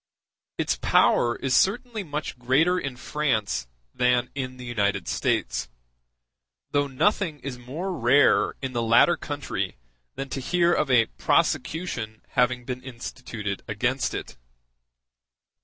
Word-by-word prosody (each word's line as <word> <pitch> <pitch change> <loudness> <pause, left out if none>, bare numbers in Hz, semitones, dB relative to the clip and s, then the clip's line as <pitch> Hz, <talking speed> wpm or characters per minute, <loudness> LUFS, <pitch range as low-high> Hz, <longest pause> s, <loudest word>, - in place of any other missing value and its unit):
Its - - 0
power 120 0 +3
is 135 -1 -2
certainly 220 +2 +1
much 150 -5 -5
greater 150 +9 +3
in 140 -6 -4
France 120 - -1 0.3
than 125 0 +2
in 130 -2 -4
the 125 - -9
United 100 -5 0
States; - - -1 1.0
though 145 0 +2
nothing 155 +3 0
is 125 -2 -6
more 160 +10 -4
rare 135 +1 +4
in 130 -1 -3
the 120 - 0
latter 115 0 +5
country - - -4 0.4
than 135 - -4
to 135 - -4
hear 175 +5 +2
of 150 - +1
a 120 -3 +5
prosecution 120 -10 0
having 125 -1 +1
been 125 0 -4
instituted 120 -5 -6
against 125 +6 -1
it. - - -6
130 Hz, 125 wpm, -25 LUFS, 120-150 Hz, 1.0 s, latter